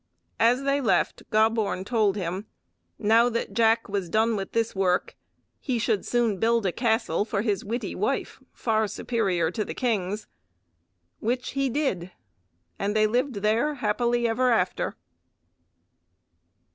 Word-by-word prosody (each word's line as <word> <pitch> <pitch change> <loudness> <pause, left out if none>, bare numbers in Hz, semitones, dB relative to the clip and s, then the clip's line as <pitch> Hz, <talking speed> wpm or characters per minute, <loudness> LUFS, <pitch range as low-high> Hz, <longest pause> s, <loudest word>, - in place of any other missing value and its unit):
As 245 +4 +3
they 275 +1 +1
left 195 -8 +1
Gobborn 215 -3 +1
told 215 -3 +2
him: 190 +2 -4 0.5
Now 230 +3 +4
that 230 -4 -3
Jack 225 +1 +3
was 195 -3 -3
done 220 +4 +2
with 195 -2 -5
this 230 0 0
work, 185 -2 +1 0.4
he 255 -4 -1
should 220 -2 0
soon 235 -5 +1
build 230 -1 +2
a 185 - +2
castle 225 -5 +1
for 210 -1 -2
his 205 -4 0
witty 230 +4 -3
wife - - -2
far 220 -2 0
superior 190 -8 -1
to 215 - -2
the - - -7
king's, 210 -4 -1 0.9
which 245 +3 -2
he 275 0 0
did, 230 - -1 0.7
and 205 +2 -1
they 215 0 +4
lived 240 -1 -1
there 230 +8 +2
happily 235 +1 +1
ever 250 +3 +2
after. 185 -6 0
220 Hz, 140 wpm, -26 LUFS, 200-235 Hz, 0.9 s, Now